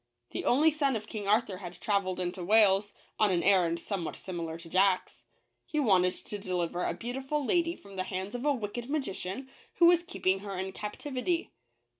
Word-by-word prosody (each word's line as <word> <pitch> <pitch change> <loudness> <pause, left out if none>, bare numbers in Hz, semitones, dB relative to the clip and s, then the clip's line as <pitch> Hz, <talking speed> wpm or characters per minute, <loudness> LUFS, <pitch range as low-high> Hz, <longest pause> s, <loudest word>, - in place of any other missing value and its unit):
The - - -4
only 300 +6 +5
son 285 -4 +1
of 215 -1 -3
King 210 -3 -5
Arthur 210 -2 +2
had 180 -2 -9
traveled 200 -4 0
into 180 0 -2
Wales, 205 0 +4 0.2
on 215 - +5
an 175 -2 +1
errand 175 -4 +3
somewhat 175 -2 -4
similar 170 -3 -5
to 170 0 -11
Jack's. 185 +2 +2 0.4
He 305 - -2
wanted 185 -8 +3
to 205 - -6
deliver 180 -2 -2
a - - -1
beautiful 270 +4 -3
lady 340 +3 +1
from 200 -1 -13
the 185 - 0
hands 190 +1 -4
of 245 0 -4
a 295 - +3
wicked 240 -1 -4
magician, 260 -5 -3 0.3
who 345 - +5
was 345 0 +6
keeping 195 - 0
her 200 -1 -6
in 190 +1 -3
captivity. 270 - -3
200 Hz, 185 wpm, -30 LUFS, 185-260 Hz, 0.4 s, was